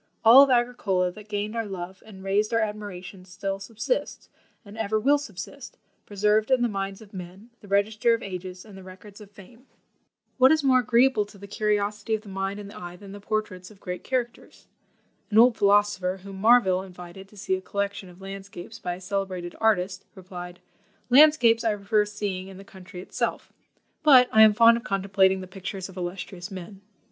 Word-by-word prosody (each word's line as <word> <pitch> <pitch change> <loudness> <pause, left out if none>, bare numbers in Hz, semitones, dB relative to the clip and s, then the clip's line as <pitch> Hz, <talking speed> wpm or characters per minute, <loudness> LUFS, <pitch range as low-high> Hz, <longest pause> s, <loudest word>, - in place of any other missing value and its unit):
All 240 +5 +10
of 280 - +5
Agricola 240 -7 +1
that 210 +3 -14
gained 210 +1 -3
our 225 -2 -2
love 190 -1 -7
and 190 -3 -12
raised 205 +3 0
our - - +3
admiration 205 -4 -5
still 195 +2 -5
subsists, 225 - -4 0.4
and 200 +1 -12
ever 220 -1 -1
will 285 +6 +3
subsist, 265 +2 -9 0.3
preserved 210 +2 +1
in 260 -2 +3
the - - +3
minds 195 -1 -5
of 205 - -19
men, 190 +5 -10
the 205 - -16
register 215 +4 +2
of 230 - -8
ages 185 0 -7
and 210 -3 -13
the 190 - -11
records 190 +3 -13
of 205 - -13
fame." 220 +6 -17 0.7
What 260 +1 +7
is 315 -2 +2
more 260 -2 +4
agreeable 245 -1 +3
to 205 0 -16
the 200 - -11
curiosity 210 +1 -1
of 215 - -6
the 205 - -12
mind 195 +1 -4
and 200 -1 -9
the - - -11
eye 175 0 -8
than 195 +2 -12
the 205 - -9
portraits 200 -3 -4
of 210 -3 -18
great 180 -2 -6
characters? 245 -2 -4 0.6
An 215 - 0
old 240 +1 +7
philosopher, 200 -2 +2
whom 195 -1 -9
Marville 195 -3 +4
invited 180 0 -11
to 210 - -19
see 195 -1 -2
a 185 - -1
collection 200 -1 -4
of 180 +2 -17
landscapes 195 +1 -9
by 175 0 -4
a 185 - -13
celebrated 185 -2 -4
artist, 195 -4 +1
replied, 180 -2 -10 0.5
"Landscapes 250 -5 +6
I 220 -2 +1
prefer 210 +1 +1
seeing 205 -3 -5
in 195 -1 -11
the 195 - -11
country 185 -1 -12
itself, - - -4 0.5
but 260 -5 +6
I 220 - +5
am 215 -1 +8
fond 230 +1 +6
of 235 - -8
contemplating 190 -1 +1
the - - -7
pictures 190 0 -7
of 190 - -13
illustrious 180 0 -6
men." 190 0 -9
200 Hz, 195 wpm, -25 LUFS, 190-220 Hz, 0.7 s, All